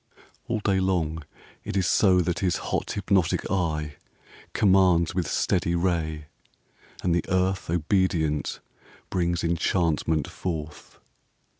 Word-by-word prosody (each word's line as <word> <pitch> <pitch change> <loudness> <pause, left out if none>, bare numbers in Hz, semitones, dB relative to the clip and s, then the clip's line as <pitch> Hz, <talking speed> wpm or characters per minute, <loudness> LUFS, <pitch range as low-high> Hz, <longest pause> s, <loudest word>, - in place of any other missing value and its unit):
VII - - -24 0.3
All 115 -2 -1
day 100 -2 +1
long 85 -4 -1 0.4
it - - -3
is 95 - +2
so 95 -1 +4
that 90 0 -1
his 90 -2 +1
hot - - -3
hypnotic 95 -4 0
eye 75 -6 -1 0.5
commands 95 -4 +3
With 90 -4 -1
steady 85 +2 0
ray; 80 -3 -1 0.8
and 90 - +2
the 85 - +1
earth 95 -1 0
obedient 80 -3 0 0.5
brings 85 -1 0
enchantment 85 -2 0
forth. 80 -4 -6
85 Hz, 120 wpm, -25 LUFS, 80-95 Hz, 0.8 s, so